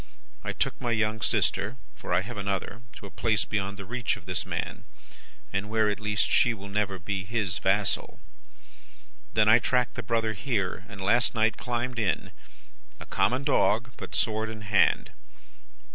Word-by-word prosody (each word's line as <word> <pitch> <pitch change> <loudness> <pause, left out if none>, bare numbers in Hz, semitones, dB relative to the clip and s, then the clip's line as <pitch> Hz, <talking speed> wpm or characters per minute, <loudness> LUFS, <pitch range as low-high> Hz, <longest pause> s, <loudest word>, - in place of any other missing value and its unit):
I - - -2
took - - -2
my 120 - -1
young 110 -1 0
sister - - +1 0.2
(for - - -8
I 90 +1 +4
have 115 +5 -7
another) 100 +2 -3
to - - -10
a 100 - -9
place 110 +1 +1
beyond 100 -1 -2
the 100 - -7
reach 120 0 -1
of 95 - -14
this 90 -1 -3
man, - - -4 0.7
and 95 +2 -1
where, 110 -1 +3
at 105 - -4
least, 105 -1 0
she 120 -2 +4
will 100 -1 -9
never 100 -1 0
be 95 +2 -3
his 100 -3 -1
vassal. 100 +1 +1 1.1
Then, 110 0 +4
I 110 +2 +8
tracked 125 0 +1
the - - -4
brother 115 0 0
here, 100 -5 -2
and 105 -4 -8
last 115 +6 +3
night 110 0 +3
climbed 120 0 -2
in 105 -4 0 0.7
a - - -9
common 130 +3 +1
dog, 125 -4 +2
but - - -6
sword 110 0 +1
in 110 -1 -7
hand. 105 -1 +2
105 Hz, 175 wpm, -28 LUFS, 100-115 Hz, 1.1 s, I